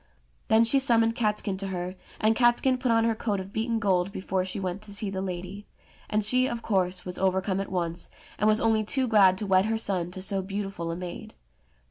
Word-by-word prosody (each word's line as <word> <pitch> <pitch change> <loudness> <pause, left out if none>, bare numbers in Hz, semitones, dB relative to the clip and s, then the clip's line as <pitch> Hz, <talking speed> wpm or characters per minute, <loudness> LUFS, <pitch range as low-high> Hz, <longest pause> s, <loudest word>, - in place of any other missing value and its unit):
Then 220 +1 +5
she 250 +4 +3
summoned 230 -4 +3
Catskin 210 -4 -1
to 195 0 -3
her, 180 -1 -4 0.3
and 220 +1 +3
Catskin 255 +2 +3
put 255 -1 -1
on 225 0 +3
her 230 0 +2
coat 215 -2 -2
of 190 +1 -8
beaten 225 +1 -1
gold 190 -3 +1
before 190 -1 -2
she 185 +2 -5
went 185 +1 -4
to 215 -1 -6
see 205 -1 -2
the 190 -1 -3
lady; 185 +2 -6 0.4
and 215 0 +1
she, 255 +4 +3
of 235 -2 -5
course, 185 -3 0
was 180 -1 -4
overcome 190 0 0
at 195 - -7
once, 170 -2 -2 0.3
and 210 - +2
was 215 0 +5
only 220 -1 +2
too 260 +4 +1
glad 195 -5 +5
to 210 - -3
wed 190 0 +3
her 220 +1 0
son 185 -5 -1
to 185 +1 -8
so 195 0 0
beautiful 195 -3 -4
a 165 - -3
maid. 175 0 -8
200 Hz, 220 wpm, -27 LUFS, 185-225 Hz, 0.4 s, Then